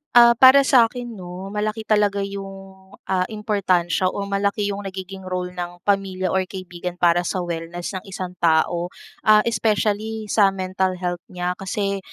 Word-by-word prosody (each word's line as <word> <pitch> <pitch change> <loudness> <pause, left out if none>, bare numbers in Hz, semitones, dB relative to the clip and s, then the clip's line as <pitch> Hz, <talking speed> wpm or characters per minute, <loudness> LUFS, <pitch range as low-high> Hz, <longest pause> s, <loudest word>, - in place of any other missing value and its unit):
Ah, 235 0 +9
para 265 +2 +8
sakin 240 -4 +2
'no, 180 +2 -8
malaki 215 +1 -2
talaga 205 -2 +2
yung, 195 0 -6 0.5
ah, 185 -1 +1
importansya 190 -5 0
o 200 +2 -3
malaki 200 +1 -1
yung 200 0 -5
nagiging 190 0 -8
role 180 -1 -3
ng 175 0 -7
pamilya 195 -2 0
or 190 -1 0
kaibigan 180 -2 -6
para 175 0 +2
sa 185 -1 -2
wellness 170 +1 -5
ng 185 -2 -6
isang 185 -1 -5
tao. 170 +1 +2 0.4
Ah, 215 0 +6
especially 215 -1 -1
sa 205 -3 +5
mental 185 0 -1
health 175 -1 -4
niya. 180 0 -3
Kasi, 195 +1 -2
195 Hz, 155 wpm, -22 LUFS, 180-210 Hz, 0.5 s, Ah